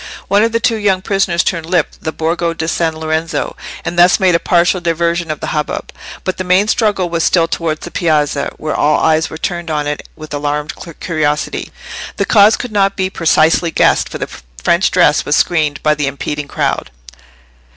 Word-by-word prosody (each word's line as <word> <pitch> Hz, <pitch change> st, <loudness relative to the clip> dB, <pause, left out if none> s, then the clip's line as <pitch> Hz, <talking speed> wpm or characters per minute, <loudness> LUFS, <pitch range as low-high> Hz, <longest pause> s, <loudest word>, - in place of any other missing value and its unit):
One 200 Hz, +1 st, +4 dB
of 230 Hz, -, +1 dB
the 230 Hz, -, +1 dB
two 230 Hz, 0 st, +1 dB
younger 195 Hz, -3 st, +1 dB
prisoners 190 Hz, -4 st, +1 dB
turned 165 Hz, -1 st, -2 dB
up 160 Hz, -, +4 dB, 0.2 s
the 160 Hz, -, -3 dB
Borgo 165 Hz, +1 st, -1 dB
di 160 Hz, -, -3 dB
San 165 Hz, 0 st, 0 dB
Lorenzo, 160 Hz, +1 st, -2 dB, 0.3 s
and 175 Hz, -, -2 dB
thus 180 Hz, +1 st, +6 dB
made 185 Hz, -2 st, +3 dB
a 170 Hz, -, +3 dB
partial 175 Hz, +1 st, +2 dB
diversion 170 Hz, 0 st, 0 dB
of 155 Hz, -, -4 dB
the -, -, -3 dB
hubbub; 150 Hz, -1 st, -3 dB, 0.3 s
but 185 Hz, -, -2 dB
the 185 Hz, -, -2 dB
main 185 Hz, +3 st, +3 dB
struggle 210 Hz, -5 st, +1 dB
was 170 Hz, -1 st, -1 dB
still 165 Hz, -2 st, +3 dB
towards 165 Hz, -2 st, -2 dB
the 175 Hz, -, -8 dB
piazza, 150 Hz, -4 st, 0 dB
where 155 Hz, -, -3 dB
all 150 Hz, 0 st, +2 dB
eyes 160 Hz, 0 st, +2 dB
were 160 Hz, -, -7 dB
turned 175 Hz, 0 st, -3 dB
on 150 Hz, -2 st, -1 dB
it 145 Hz, 0 st, -4 dB
with 155 Hz, -1 st, -10 dB
alarmed 145 Hz, +1 st, -2 dB, 0.3 s
curiosity. 155 Hz, -3 st, -2 dB, 0.5 s
The -, -, +1 dB
cause 210 Hz, 0 st, +5 dB
could 245 Hz, -, -6 dB
not 195 Hz, -1 st, +2 dB
be 190 Hz, 0 st, -1 dB
precisely 165 Hz, 0 st, +3 dB
guessed, -, -, +2 dB
for -, -, -6 dB
the -, -, -5 dB, 0.3 s
French 170 Hz, +2 st, +3 dB
dress 170 Hz, -5 st, +3 dB
was 145 Hz, -, +1 dB
screened 155 Hz, -4 st, +1 dB
by 155 Hz, -, +4 dB
the 150 Hz, -1 st, -2 dB
impeding 145 Hz, +1 st, -4 dB
crowd. -, -, -2 dB
165 Hz, 195 wpm, -15 LUFS, 155-185 Hz, 0.5 s, thus